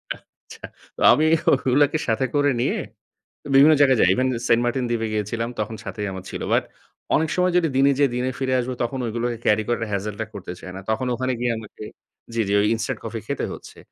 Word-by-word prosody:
আচ্ছা। - - -18 0.3
তো - - -9
আমি 155 - +2 0.3
ওগুলাকে 140 +3 +3
সাথে 115 +3 +1
করে 145 0 +3
নিয়ে - - 0 0.8
বিভিন্ন 140 +4 +7
জায়গায় 135 -3 +5
যাই। 90 - +5
ইভেন 130 +5 +1 0.2
সেন্ট 115 0 +4
মার্টিন 125 +1 0
দ্বীপে 115 -1 -1
গিয়েছিলাম। 110 +2 -2
তখন 110 +1 -3
সাথেই 105 -2 -4
আমার 95 -1 -7
ছিল। - - -6
বাট - - +3 0.5
অনেক 160 +1 +1
সময় 180 0 +2
যদি 170 -2 +3
দিনে 140 +1 +5
যেয়ে 140 -3 +3
দিনে 125 +1 -1
ফিরে 130 -1 0
আসবো 125 +1 -2
তখন 130 +3 -3
ঐগুলোকে 120 +1 -2
ক্যারি 105 +1 +3
করার 120 -1 0
হেজেল 100 +1 -3
টা - - -1
করতে 90 -3 -7
চাই 90 - -9
না। - - -6
তখন 120 +4 -1
ওখানে 130 +1 -1
গিয়ে 120 0 0
আমাকে 110 -1 -10 0.5
জি, 115 - +1
জি, 100 - 0
ঐ - - +4
ইনস্টান্ট 115 - -3
কফি 115 0 -4
খেতে 140 - -2
হচ্ছে। - - -12
120 Hz, 205 wpm, -23 LUFS, 110-135 Hz, 0.8 s, বিভিন্ন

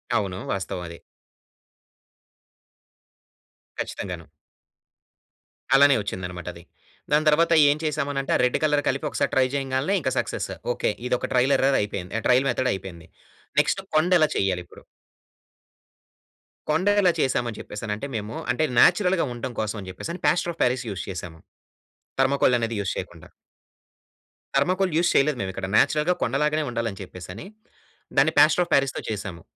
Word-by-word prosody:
అవును. 95 -3 -1
వాస్తవం 95 -2 -4
అది. 85 0 -9 2.8
ఖచ్చితంగాను. 90 -4 -6 1.5
అలానే 140 0 +6
వచ్చిందన్నమాట 90 -3 -6
అది. 85 - -13 0.5
దాని 150 +1 +3
తర్వాత 165 +3 +3 0.2
ఏం 145 - +2
చేసామనంటే 145 -3 -2
ఆ - - +1
రెడ్ 125 - +1
కలర్ 150 -1 +2
కలిపి 135 +3 -2
ఒకసారి - - -1
ట్రై 130 - +4
చేయంగాల్నే 135 +6 0
ఇంక 130 - 0
సక్సెస్. - - -3 0.2
ఓకే. - - 0 0.2
ఇదొక 125 0 -1
ట్రైల్ 130 +2 +3
ఎర్రర్ 135 +1 +3
అయిపోయింది. 100 -3 -5
ఆ - - -8
ట్రైల్ 125 +2 +4
మెథడ్ 130 - 0
అయిపోయింది. 90 -4 -8 0.5
నెక్స్ట్ - - -1
కొండ 160 +4 +3
ఎలా 155 - +4
చెయ్యాలి 95 -2 0
ఇప్పుడు? - - -16 1.9
కొండ 160 +6 +1
ఎలా 180 -3 +4
చేశామని 120 -4 0
చెప్పేసి 105 - -8
అనంటే 105 +6 -3
మేము 110 +1 -4 0.2
అంటే 125 +6 0 0.2
నేచురల్‌గా 185 -4 +4
ఉండటం 120 +1 -5
కోసం 110 +1 -3
అని 95 - -9
చెప్పేసి 95 - -7
అని 180 - -8
ప్లాస్టర్ 175 -1 +2
ఆఫ్ 165 - -24
పారిస్ 125 0 0
యూస్ 95 - -5
చేసాము. 90 -3 -7 0.8
థర్మాకోల్ 135 -2 +3
అనేది 115 0 -2
యూజ్ 100 - -2
చేయకుండా. - - -8 1.3
థర్మాకోల్ 185 +5 +1
యూస్ 175 0 +3
చేయలేదు 140 0 +3
మేమిక్కడ. 95 0 -4
నేచురల్‌గా 155 +4 +3
కొండ 120 - -1
లాగానే 155 +1 +1
ఉండాలి 115 -1 -2
అని 95 - -11
చెప్పేసని 90 - -9 0.7
దాన్ని - - +4
ప్లాస్టర్ 180 - +6
ఆఫ్ - - -23
పారిస్‌తో 135 -1 +1
చేసాము. 100 -5 -5
130 Hz, 145 wpm, -24 LUFS, 100-150 Hz, 2.8 s, అలానే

